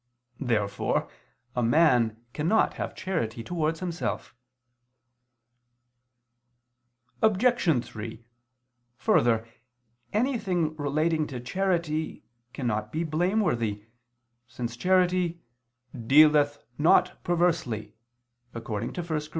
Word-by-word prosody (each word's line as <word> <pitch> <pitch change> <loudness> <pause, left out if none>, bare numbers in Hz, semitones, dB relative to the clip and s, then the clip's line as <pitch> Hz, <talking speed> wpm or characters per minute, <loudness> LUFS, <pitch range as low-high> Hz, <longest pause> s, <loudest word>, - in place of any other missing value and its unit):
Therefore 105 -6 0 0.5
a 125 - +1
man 120 -4 +3
cannot 170 +9 +2
have - - -5
charity 120 -12 -3
towards 160 +2 -2
himself. 175 -2 -3 2.9
Obj. 215 - +3
3: 115 +1 -8 0.7
Further, 115 -3 +2 0.6
anything 195 - 0
relating 155 +2 0
to 130 -3 -6
charity 165 +2 -1 0.3
cannot 110 -5 -2
be 160 +2 -1
blameworthy, 155 - 0 0.6
since 120 -2 -5
charity 180 +3 +2 0.6
"dealeth 145 +4 +4
not 160 - +3
perversely" 165 -11 0 0.6
(1 115 - -6
Cor. 105 -3 -3
155 Hz, 75 wpm, -27 LUFS, 115-175 Hz, 2.9 s, dealeth